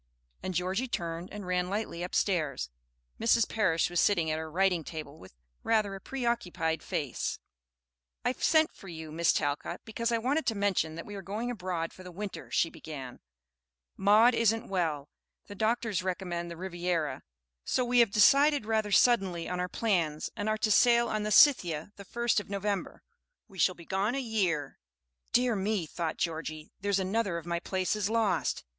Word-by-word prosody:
And 185 -1 -4
Georgie 190 +8 0
turned 170 -5 -4
and 205 -2 -7
ran 180 0 0
lightly 200 -4 -3
upstairs. 160 - -1 0.5
Mrs. 230 0 +3
Parish 185 -8 +1
was 175 -1 -1
sitting 170 -6 +3
at 155 - -1
her 160 0 -5
writing 180 0 +1
table 155 -1 -8
with 95 - -15 0.3
rather 215 -3 +1
a 195 - -8
preoccupied 190 - -2
face. 140 -5 -3 0.9
"I 245 - +3
sent 315 +4 +2
for 195 - -14
you, 160 -3 -8
Miss 165 +1 +3
Talcott, 145 +4 -2
because 230 +1 -2
I 230 - +2
wanted 270 +7 0
to 225 - +1
mention 195 -6 0
that 170 - -7
we 205 - -9
are 200 - -6
going 210 +6 -3
abroad 180 -6 -3
for - - -13
the 180 -1 -9
winter," 200 +3 -6
she 165 - +1
began. 135 -5 -8 0.8
"Maud 215 +5 +5
isn't 225 0 +1
well, 160 -7 -1 0.4
the 205 - -9
doctors 220 -1 0
recommend 180 -2 -3
the 170 - -8
Riviera, 175 -6 -2 0.4
so 255 - 0
we 245 0 +3
have 235 -3 +6
decided 275 +6 +5
rather 220 -1 0
suddenly 195 -7 +3
on 180 0 -3
our 180 0 -1
plans, 170 -10 0
and 205 +1 -2
are 215 - +1
to 215 0 0
sail 235 +2 +5
on 215 - -1
the 210 0 -2
'Scythia' 190 - +5
the 200 - -10
first 235 +2 +1
of 205 - -9
November. 200 -1 -3 0.4
We 195 -4 -13
shall 185 +2 +3
be 170 - -13
gone 195 +7 0
a - - 0
year." 190 - -1 0.5
"Dear 245 -2 +3
me," 200 -2 -1
thought 160 0 -4
Georgie, 155 -2 -4
"there's 200 -1 +1
another 195 -1 0
of 165 - -7
my 170 0 -1
places 190 +3 -1
lost! 225 -2 0
190 Hz, 175 wpm, -30 LUFS, 170-220 Hz, 0.9 s, have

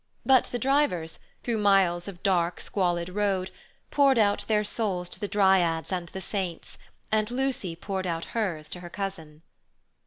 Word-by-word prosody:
But 265 -2 +5
the 245 - -3
drivers, 250 - +1 0.2
through 230 -3 0
miles 195 -4 +3
of 185 -3 -9
dark 175 -3 +1
squalid 175 -3 -1
road, 190 -1 0 0.4
poured 275 -3 +4
out 205 -2 +2
their 215 -1 +2
souls 200 -5 -1
to - - -6
the 205 - -2
dryads 190 -6 +3
and 175 -2 -2
the 190 - -7
saints, 185 -4 -4 0.3
and 215 0 +2
Lucy 245 -9 -1
poured 190 +1 -3
out 165 -1 -2
hers 180 -9 -2
to 180 - -5
her 175 -1 -9
cousin. 170 -5 -6
190 Hz, 160 wpm, -27 LUFS, 175-210 Hz, 0.4 s, But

